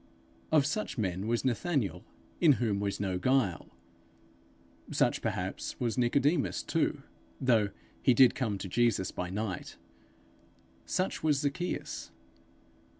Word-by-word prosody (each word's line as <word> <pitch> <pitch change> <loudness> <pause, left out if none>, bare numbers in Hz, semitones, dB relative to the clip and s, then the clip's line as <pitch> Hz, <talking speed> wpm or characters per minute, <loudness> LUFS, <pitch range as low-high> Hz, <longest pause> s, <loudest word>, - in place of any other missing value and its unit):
Of 155 -3 +5
such 185 +5 -2
men 95 -2 -1
was 120 +2 0
Nathanael, 130 - 0 0.4
in 160 -4 +6
whom 110 -6 0
was 100 -1 -2
no 95 -3 -1
guile; 125 - +1 1.2
such, - - +1
perhaps, - - -3
was 115 -3 0
Nicodemus 140 +5 +1
too, 155 -3 0 0.4
although 115 -6 +3 0.3
he 125 - +4
did 130 0 +7
come 110 -7 -1
to 95 - -6
Jesus 115 -2 +1
by 90 0 -4
night; 100 -1 -4 1.1
such 185 - -1
was 150 -2 +2
Zacchaeus. 170 +5 -3
120 Hz, 120 wpm, -30 LUFS, 100-140 Hz, 1.2 s, did